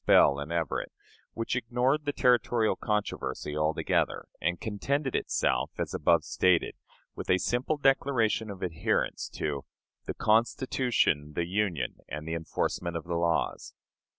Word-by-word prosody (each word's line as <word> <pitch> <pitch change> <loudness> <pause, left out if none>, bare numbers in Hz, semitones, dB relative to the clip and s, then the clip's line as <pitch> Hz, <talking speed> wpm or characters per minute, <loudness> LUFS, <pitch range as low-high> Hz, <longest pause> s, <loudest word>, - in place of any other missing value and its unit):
Bell 70 - +6
and 70 +3 -5
Everett, 85 -2 -1 0.4
which 115 +1 -2
ignored 125 +5 +1
the 145 - +1
territorial 120 -4 +3
controversy 105 -7 -2
altogether, 75 +1 0 0.2
and 90 0 0
contented 135 +6 -1
itself, - - +1
as - - -3
above 85 -2 +3
stated, 90 +1 +2 0.4
with - - -7
a 90 - +5
simple 125 +10 0
declaration 130 -6 +2
of 95 -2 -7
adherence 85 -3 -1
to 70 -2 -2 0.4
"the - - -3
Constitution, 110 - +1
the 85 - 0
Union, 90 -6 -1
and 75 +2 -6
the 80 - -2
enforcement 85 +1 -2
of 80 - -6
the 85 - -4
laws." 85 -1 0
100 Hz, 135 wpm, -29 LUFS, 80-120 Hz, 0.4 s, Bell